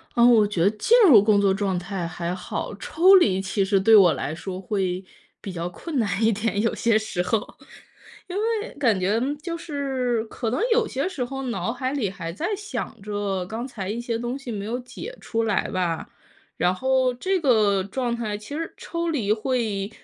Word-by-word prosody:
嗯， 240 Hz, +1 st, +6 dB
我 215 Hz, -2 st, +5 dB
觉 185 Hz, -5 st, -1 dB
得 195 Hz, -, +5 dB
进 330 Hz, -, +3 dB
入 230 Hz, -10 st, +8 dB
工 205 Hz, 0 st, +4 dB
作 200 Hz, -1 st, +3 dB
状 195 Hz, -2 st, -1 dB
态 180 Hz, -1 st, -4 dB
还 170 Hz, +1 st, -4 dB
好， 185 Hz, +2 st, -5 dB
抽 345 Hz, -, +5 dB
离 205 Hz, -, +4 dB
其 195 Hz, +1 st, 0 dB
实 195 Hz, 0 st, +2 dB
对 220 Hz, +4 st, +6 dB
我 185 Hz, -6 st, +7 dB
来 150 Hz, -, -3 dB
说 185 Hz, +3 st, -6 dB
会 190 Hz, -2 st, -2 dB, 0.4 s
比 195 Hz, -, -6 dB
较 175 Hz, -1 st, -4 dB
困 290 Hz, -, -4 dB
难 210 Hz, -1 st, 0 dB
一 220 Hz, -, +5 dB
点， 215 Hz, -1 st, -1 dB
有 230 Hz, -, +1 dB
些 230 Hz, -2 st, +2 dB
时 215 Hz, -4 st, -2 dB
候。 205 Hz, +4 st, -2 dB, 0.7 s
因 365 Hz, -, -6 dB
为 445 Hz, +2 st, -1 dB
感 235 Hz, -9 st, +2 dB
觉 200 Hz, +5 st, +1 dB, 0.2 s
就 335 Hz, +1 st, -4 dB
是， 270 Hz, -7 st, -2 dB
可 225 Hz, +1 st, -4 dB
能 255 Hz, +7 st, -1 dB
有 460 Hz, -1 st, +3 dB
些 275 Hz, 0 st, -2 dB
时 300 Hz, -9 st, -3 dB
候 270 Hz, +2 st, -5 dB
脑 235 Hz, -2 st, -2 dB
海 255 Hz, +2 st, -3 dB
里 230 Hz, -9 st, -1 dB
还 180 Hz, -4 st, -6 dB
在 315 Hz, -, -3 dB
想 410 Hz, -, -6 dB
着， 200 Hz, -2 st, -2 dB
刚 225 Hz, +6 st, -5 dB
才 200 Hz, -7 st, -6 dB
一 230 Hz, +3 st, -3 dB
些 235 Hz, -1 st, -2 dB
东 240 Hz, +2 st, -3 dB
西 270 Hz, -4 st, -7 dB
没 200 Hz, -2 st, -4 dB
有 235 Hz, +3 st, -2 dB
解 270 Hz, -, -9 dB
出 230 Hz, 0 st, -1 dB
来 210 Hz, -3 st, 0 dB
吧。 175 Hz, -3 st, -2 dB, 0.5 s
然 180 Hz, +1 st, +2 dB
后 260 Hz, +3 st, +2 dB
这 375 Hz, +9 st, -1 dB
个 215 Hz, -, +3 dB
状 240 Hz, +3 st, -2 dB
态， 215 Hz, -3 st, -3 dB
其 210 Hz, +7 st, -10 dB
实 330 Hz, 0 st, -4 dB
抽 335 Hz, 0 st, -4 dB
离 220 Hz, -10 st, 0 dB
会 215 Hz, -4 st, -1 dB
220 Hz, 220 characters per minute, -24 LUFS, 195-260 Hz, 0.7 s, 入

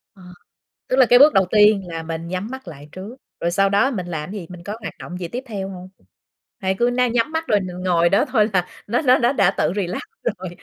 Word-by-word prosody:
Ờ, 190 Hz, -, -18 dB, 0.7 s
tức 255 Hz, -, 0 dB
là 260 Hz, -, +7 dB
cái 245 Hz, +1 st, +6 dB
bước 295 Hz, +3 st, +7 dB
đầu 190 Hz, -1 st, +4 dB
tiên 210 Hz, -1 st, +5 dB
là 165 Hz, -1 st, -5 dB
mình 165 Hz, +1 st, -5 dB
nhắm 185 Hz, +3 st, -4 dB
mắt 265 Hz, -6 st, -8 dB
lại 150 Hz, -2 st, -11 dB
trước, 195 Hz, +6 st, -9 dB, 0.2 s
rồi 170 Hz, -, -1 dB
sau 195 Hz, +2 st, +2 dB
đó 205 Hz, +8 st, +2 dB
mình 185 Hz, -7 st, -4 dB
làm 160 Hz, 0 st, -5 dB
cái 210 Hz, -, -5 dB
gì, 165 Hz, -, -11 dB
mình 175 Hz, -1 st, -11 dB
có 210 Hz, +2 st, -5 dB
hoạt -, -, -6 dB
động 180 Hz, -, -7 dB
gì 175 Hz, -, -4 dB
tiếp 250 Hz, +6 st, -6 dB
theo 195 Hz, -4 st, -5 dB
hông? 185 Hz, -1 st, -9 dB, 0.7 s
Hay 190 Hz, 0 st, -1 dB
cứ 240 Hz, -, +3 dB
ná 250 Hz, 0 st, +2 dB
nhắm 240 Hz, +5 st, 0 dB
mắt 320 Hz, 0 st, -3 dB
rồi 210 Hz, -2 st, +3 dB
mình 180 Hz, -1 st, -6 dB
ngồi 170 Hz, -2 st, +3 dB
đó 200 Hz, -, +3 dB
thôi 220 Hz, -4 st, +2 dB
là 180 Hz, -1 st, +1 dB, 0.2 s
nó 235 Hz, +6 st, +1 dB
nó 255 Hz, -4 st, +5 dB
nó 240 Hz, +2 st, +2 dB
đã 195 Hz, -7 st, +3 dB
tự 155 Hz, +3 st, +1 dB
relax 185 Hz, -3 st, -2 dB, 0.2 s
rồi? 190 Hz, -5 st, -3 dB
195 Hz, 260 wpm, -21 LUFS, 180-235 Hz, 0.7 s, là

